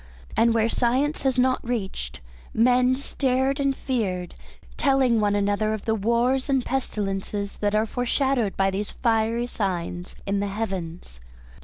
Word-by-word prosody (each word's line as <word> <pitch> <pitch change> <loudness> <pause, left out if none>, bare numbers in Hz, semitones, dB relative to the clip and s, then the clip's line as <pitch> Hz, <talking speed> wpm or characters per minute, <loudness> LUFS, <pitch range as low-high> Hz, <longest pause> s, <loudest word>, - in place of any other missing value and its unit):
And 230 0 +4
where 225 0 +3
science 260 +6 +1
has 265 -2 +1
not 255 0 +2
reached, 190 - -4 0.3
men 250 +2 +4
stared 265 0 0
and 275 -1 +1
feared, 195 -11 -2 0.4
telling 265 -4 +3
one 205 -1 +2
another 205 +2 +1
of 215 - -9
the 220 - +2
wars 235 +5 +1
and 265 -3 +2
pestilences 200 -5 -2
that 205 0 0
are 215 +1 +3
foreshadowed 245 -1 0
by 195 0 +2
these 200 +2 -3
fiery 230 0 +1
signs 180 -5 -3
in 200 0 0
the 200 - -1
Heavens. 185 - -5
225 Hz, 145 wpm, -25 LUFS, 200-255 Hz, 0.4 s, And